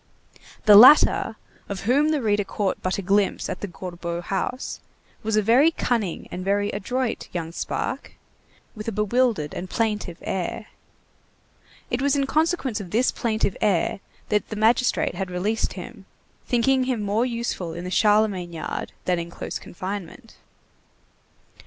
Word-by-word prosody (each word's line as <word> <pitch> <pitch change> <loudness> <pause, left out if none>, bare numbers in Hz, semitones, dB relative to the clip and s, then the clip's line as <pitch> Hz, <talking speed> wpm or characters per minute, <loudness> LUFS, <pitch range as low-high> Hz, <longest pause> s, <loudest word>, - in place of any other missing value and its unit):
The 210 -1 +9
latter, 235 -1 +7 0.3
of 200 -2 -4
whom 280 +8 +3
the 300 -4 0
reader 205 -1 +2
caught 195 0 -2
but 185 - -1
a 200 - -4
glimpse 200 +2 +1
at - - -5
the 205 - -3
Gorbeau 175 -1 -6
house, 195 +8 -3 0.4
was 220 0 -1
a 215 - +3
very 250 +9 +5
cunning 230 - -2
and 180 - -5
very 205 +1 +1
adroit 250 +3 -3
young 165 -2 -3
spark, - - -4 0.6
with 215 0 -8
a - - 0
bewildered 210 -5 +1
and 185 - -6
plaintive 210 -6 -1
air. 190 +3 -3 1.2
It 240 - 0
was 280 +1 +2
in 275 -1 +1
consequence 310 -5 0
of 185 - -8
this 235 +7 +2
plaintive 220 -4 -1
air 195 -3 +1 0.3
that 210 0 0
the 220 - -4
magistrate 230 +4 +2
had 190 +1 -4
released 200 +5 -1
him, 200 0 -10 0.4
thinking 255 +2 +2
him 250 -5 -1
more 205 +3 +1
useful 235 -8 -3
in 170 - -6
the 180 - -5
Charlemagne 205 -4 +2
yard 160 - -5
than 180 -1 +1
in 170 0 -5
close - - -6
confinement. 195 +5 -7
210 Hz, 150 wpm, -24 LUFS, 185-240 Hz, 1.2 s, The